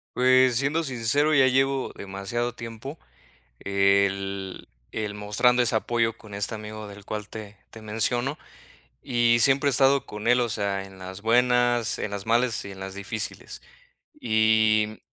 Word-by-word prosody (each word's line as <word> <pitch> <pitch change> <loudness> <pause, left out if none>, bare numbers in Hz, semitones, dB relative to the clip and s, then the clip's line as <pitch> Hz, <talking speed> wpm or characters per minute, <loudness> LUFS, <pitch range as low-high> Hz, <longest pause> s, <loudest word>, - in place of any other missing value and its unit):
Pues, 130 0 +4
siendo 145 +6 +1
sincero, 135 +4 +1
ya 135 -1 +6
llevo 135 +1 +1
demasiado 100 +5 -4
tiempo, 115 +6 -8 0.6
el 100 -1 0 0.2
el 105 -1 -4
mostrando 105 +4 +2
ese 120 -2 +1
apoyo 115 0 0
con 105 -3 -13
este 100 +2 -1
amigo 110 0 -7
del 100 -1 -12
cual 105 -1 -5
te 105 -2 -9
te 110 - -12
menciono 120 +6 -1 0.6
y 120 -2 +2
siempre 140 +2 +4
he - - +3
estado 135 0 +3
con 105 +2 -5
él, 125 0 +4
o 120 - 0
sea, 100 -1 -2
en 95 -1 -14
las 95 +1 -8
buenas, 120 0 +2
en 105 - -3
las 100 +1 -6
malas 120 +1 +1
y 100 - -8
en 95 - -12
las 95 0 -6
difíciles. 100 +2 -5 0.6
Y, 110 -1 +2
110 Hz, 155 wpm, -25 LUFS, 100-125 Hz, 0.6 s, ya